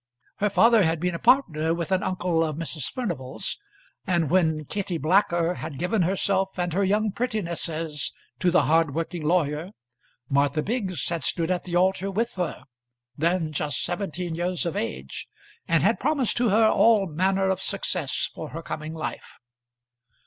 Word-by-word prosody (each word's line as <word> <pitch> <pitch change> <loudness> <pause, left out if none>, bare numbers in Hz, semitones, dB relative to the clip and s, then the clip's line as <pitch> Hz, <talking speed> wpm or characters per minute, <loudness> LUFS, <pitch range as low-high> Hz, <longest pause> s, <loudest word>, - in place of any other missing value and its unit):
Her 210 - +1
father 230 +2 +5
had 165 -2 +1
been 180 +1 -1
a 170 - -4
partner 165 - +3
with 170 +1 -4
an 185 -1 +2
uncle 180 -3 0
of 155 -2 -2
Mrs. 160 -3 -4
Furnival's; 175 - -3 0.5
and 170 -5 +1
when 160 -4 +2
Kitty 195 +1 -3
Blacker 170 +1 +2
had 155 -5 -6
given 180 - 0
herself 190 +2 0
and 175 -2 -1
her 200 +3 +2
young 210 +2 +2
prettinesses 170 - -2 0.3
to 180 - +3
the 175 -3 +4
hardworking 165 +3 +1
lawyer, 155 0 0 0.6
Martha 140 +3 +1
Biggs 195 - -2
had 170 -1 -2
stood 165 +5 +1
at 180 - -1
the 175 -1 -3
altar 190 +2 +2
with 230 +5 -1
her, 180 -4 -3 0.5
then 165 0 0
just 150 -1 -1
seventeen 175 -1 -3
years 175 +2 -1
of 170 - -2
age, 65 -11 -4 0.4
and 165 -1 +3
had 215 +5 +3
promised 280 -4 +1
to 240 -1 +3
her 220 +3 +5
all 220 -2 +4
manner 190 +3 +1
of 190 0 -2
success 180 -8 -1
for 155 - -7
her 165 +1 -7
coming 155 +1 -5
life. 155 - -6
175 Hz, 165 wpm, -25 LUFS, 160-195 Hz, 0.6 s, father